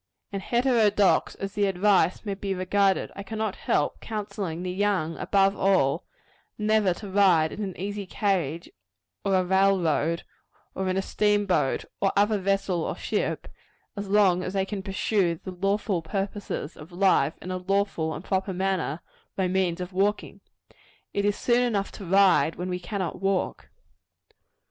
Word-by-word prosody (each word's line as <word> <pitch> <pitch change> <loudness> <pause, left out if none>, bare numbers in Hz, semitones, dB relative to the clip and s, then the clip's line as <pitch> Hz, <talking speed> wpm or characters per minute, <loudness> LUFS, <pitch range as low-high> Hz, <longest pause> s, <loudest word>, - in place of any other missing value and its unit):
And 195 -1 -3
heterodox 230 -4 +2
as 195 0 -5
the 205 -1 +1
advice 190 0 +2
may 200 - -2
be 195 0 -3
regarded, 190 +1 +1
I - - -6
cannot 215 +1 -3
help 145 - 0
counselling 200 -6 -4
the 180 - -2
young, 185 -4 0
above 195 0 +2
all, 175 -7 +2 0.5
never 215 -2 +2
to 205 +1 -8
ride 180 -6 +4
in 215 - -6
an 190 -2 -5
easy 200 +1 -4
carriage, 175 -6 -1 0.6
or 195 - +2
a 185 - +3
railroad, 180 -4 +2 0.5
or 190 -1 -2
in 185 - 0
a 195 - 0
steamboat 205 -10 +1 0.2
or 195 - +3
other 205 +1 +3
vessel 195 -3 0
or - - -3
ship, - - -2 0.5
as 200 -1 -5
long 195 -3 +4
as 185 - -4
they 195 -1 +1
can 200 0 -4
pursue 190 -2 0
the 185 +3 -8
lawful 195 0 0
purposes 195 -2 -4
of 155 +3 -12
life, 175 -5 +2
in 185 - -7
a 185 - -2
lawful 185 -4 -1
and 165 - -8
proper 190 0 -1
manner, 180 -4 -1 0.3
by 190 -1 +1
means 180 -1 0
of 180 +1 -6
walking. 200 +3 -1 0.7
It 200 - 0
is 205 0 +1
soon 240 0 +2
enough 215 -5 0
to 200 - -9
ride 190 -2 +4
when 180 +1 -4
we 180 0 -2
cannot 185 -1 -4
walk. 195 -1 -1
195 Hz, 160 wpm, -26 LUFS, 180-205 Hz, 0.7 s, ride